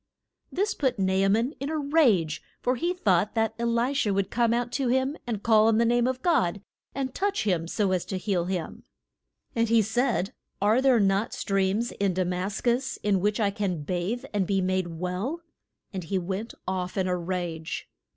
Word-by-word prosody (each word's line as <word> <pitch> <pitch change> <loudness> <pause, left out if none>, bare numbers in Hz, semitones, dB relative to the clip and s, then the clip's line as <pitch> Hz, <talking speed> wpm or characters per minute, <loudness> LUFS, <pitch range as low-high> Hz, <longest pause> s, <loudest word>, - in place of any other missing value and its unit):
This 405 +3 0
put 265 -5 0
Na 190 -1 +1
a 195 +1 +3
man 230 +8 +2
in 275 - -3
a 315 - -1
rage, 265 - +2 0.2
for 250 - +1
he 340 +7 0
thought 205 - +1
that 225 -1 +1
E 235 - 0
li 235 +3 +1
sha 270 -6 +1
would 195 0 0
come 235 -1 +2
out 240 +1 0
to 270 -3 -1
him 260 +3 +1
and 220 -4 -3
call 220 -2 +5
on 225 -1 +4
the 235 - +4
name 240 +1 +3
of 260 0 -2
God, 205 - +2 0.4
and 260 -2 -2
touch 400 +1 0
him 175 -5 0
so 195 +2 0
as 185 -2 +1
to 190 - -3
heal 180 -2 0
him. 180 -3 -4 0.7
And 230 -1 +2
he 230 -1 +5
said, 235 -1 0 0.3
Are 215 +5 +3
there 260 -3 +4
not 195 +1 +1
streams 195 +4 0
in 195 -3 -1
Da 185 - +2
mas 180 +3 -2
cus 250 +2 0
in 205 -2 +2
which 205 +3 0
I 205 -2 +2
can 195 -6 -2
bathe 180 +9 -2
and 195 -3 +1
be 195 -1 +1
made 185 -1 0
well? 180 - -3 0.5
And 185 -2 -4
he 190 +4 -1
went 190 +5 -4
off 185 0 -2
in 190 -1 +1
a 180 - +1
rage. 175 -2 -4
205 Hz, 205 wpm, -27 LUFS, 185-240 Hz, 0.7 s, call